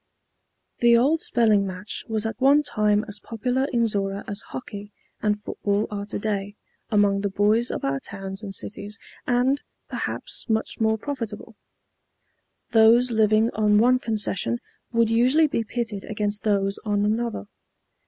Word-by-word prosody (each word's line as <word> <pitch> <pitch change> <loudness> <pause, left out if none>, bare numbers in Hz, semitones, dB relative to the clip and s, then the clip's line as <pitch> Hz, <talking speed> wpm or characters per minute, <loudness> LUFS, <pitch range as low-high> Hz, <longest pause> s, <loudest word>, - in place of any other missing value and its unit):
The 235 -1 +6
old 295 +7 +3
spelling 215 -4 +3
match 190 +3 -6
was 220 -1 -1
at 225 +3 -4
one 285 +3 +5
time 210 -3 +1
as 205 0 -6
popular 250 +5 -1
in 235 -2 +2
Zorra 200 -2 -1
as 200 +1 -4
hockey 205 -4 -8 0.3
and 210 -1 +1
football 205 0 -1
are 205 -1 -4
today 205 -1 -3 0.3
among 205 -3 +3
the 200 - 0
boys 210 +5 +2
of - - -3
our 135 0 0
towns 195 +4 -7
and 205 -3 -6
cities, 205 +2 -5 0.3
and 255 +3 +2 0.3
perhaps - - -4
much 220 0 -1
more 220 0 +2
profitable. 230 -4 -6 1.2
Those 235 +2 +5
living 220 0 +3
on 210 -1 +3
one 250 +3 +4
concession 205 - 0 0.3
would 230 -1 +2
usually 255 +7 +4
be 255 -6 -1
pitted 225 -3 -4
against 205 -1 -2
those 200 -2 0
on 205 -1 +1
another. 220 - -1
215 Hz, 145 wpm, -24 LUFS, 205-235 Hz, 1.2 s, The